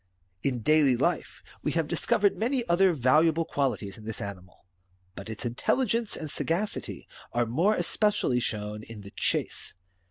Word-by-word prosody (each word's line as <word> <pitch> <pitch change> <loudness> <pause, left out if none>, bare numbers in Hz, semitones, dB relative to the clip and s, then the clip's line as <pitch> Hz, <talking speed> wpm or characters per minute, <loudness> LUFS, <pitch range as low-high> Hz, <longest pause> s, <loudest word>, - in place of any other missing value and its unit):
In 125 -2 -1
daily 150 -4 +4
life 170 +8 -1 0.2
we - - -1
have - - +1
discovered 405 - +2
many 245 +1 0
other 185 +2 +5
valuable 155 +4 +3
quali 140 -3 0
ties 100 +1 -8
in 110 - -12
this 110 -1 -5
animal; 95 -3 -8 0.5
but 110 - -8
its 110 +2 -6
intelligence 230 - 0
and 155 -2 -5
sagacity 185 +6 -2 0.3
are 120 0 +2
more 165 - +2
especially 190 - +1
shown 105 -2 -3
in 110 -1 -10
the 100 0 -11
chase. - - -1
140 Hz, 155 wpm, -28 LUFS, 110-180 Hz, 0.5 s, other